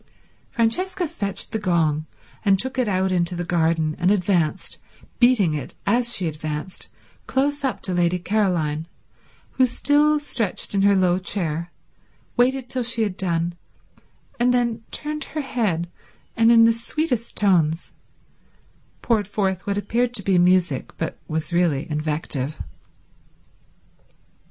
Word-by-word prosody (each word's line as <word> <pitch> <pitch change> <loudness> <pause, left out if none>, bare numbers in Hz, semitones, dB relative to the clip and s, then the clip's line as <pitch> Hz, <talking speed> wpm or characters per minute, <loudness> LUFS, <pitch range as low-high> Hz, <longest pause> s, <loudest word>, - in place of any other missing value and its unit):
Francesca 350 +10 0
fetched 200 -8 -4
the 220 - -2
gong, 160 -5 +1 0.4
and 195 -2 +4
took 260 +5 0
it 250 - +2
out 190 -1 +1
into 175 -1 0
the 175 0 -3
garden 160 -2 +1
and 180 +1 +2
advanced, 180 -4 0 0.4
beating 240 -9 +4
it 145 -4 -5
as 235 +4 +3
she 180 - 0
advanced, 155 +3 -5 0.4
close 285 +2 0
up 265 - -1
to 185 - -2
Lady 175 0 +2
Caroline, 175 -6 0 0.6
who, 260 - +3
still 295 +4 +2
stretched 230 -11 -2
in 200 - +2
her 200 0 +5
low 180 -1 +2
chair, 170 -3 -1 0.6
waited 255 +1 +2
till 255 0 -2
she 230 -1 +1
had 205 -4 -2
done, 170 -2 -1 0.9
and 245 +1 +3
then 235 -2 0
turned 300 0 -3
her 310 - -4
head 205 - -1 0.5
and 225 0 +5
in 230 -1 +7
the 230 0 +5
sweetest 235 0 -3
tones 170 -5 +2 1.1
poured 215 -5 +1
forth 190 -3 -2
what 200 0 0
appeared 235 +4 0
to 200 - -2
be 185 -2 +3
music 175 -6 +2
but 165 - -4
was 160 +2 -2
really 170 -4 +1
invective. 150 -2 -2
195 Hz, 135 wpm, -22 LUFS, 170-235 Hz, 1.1 s, in